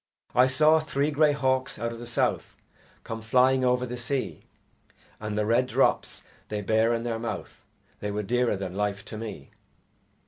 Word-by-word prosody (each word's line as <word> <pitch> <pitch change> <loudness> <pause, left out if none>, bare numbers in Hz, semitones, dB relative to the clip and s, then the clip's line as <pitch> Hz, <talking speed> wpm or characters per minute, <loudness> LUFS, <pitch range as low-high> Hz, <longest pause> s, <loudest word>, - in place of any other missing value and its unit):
I 125 +1 +5
saw 155 +4 +4
three 150 -1 -1
grey 150 0 +4
hawks 130 -2 0
out 115 0 -2
of 115 - -9
the 120 - -7
South 115 - -1 0.5
Come 115 0 -6
flying 130 +3 +3
over 125 0 +2
the 125 0 -5
sea, 125 +3 -3 0.7
And 105 -1 -4
the 105 - +1
red 120 +4 +2
drops - - +1 0.2
they 105 -1 -3
bare 110 +3 +2
in 115 0 -1
their 115 -1 -2
mouth 115 0 -6 0.4
They 105 - -3
were 105 +1 -2
dearer 120 0 +1
than 95 -2 -5
life 100 0 -2
to 110 - -7
me. 105 -11 -7
120 Hz, 175 wpm, -27 LUFS, 110-130 Hz, 0.7 s, I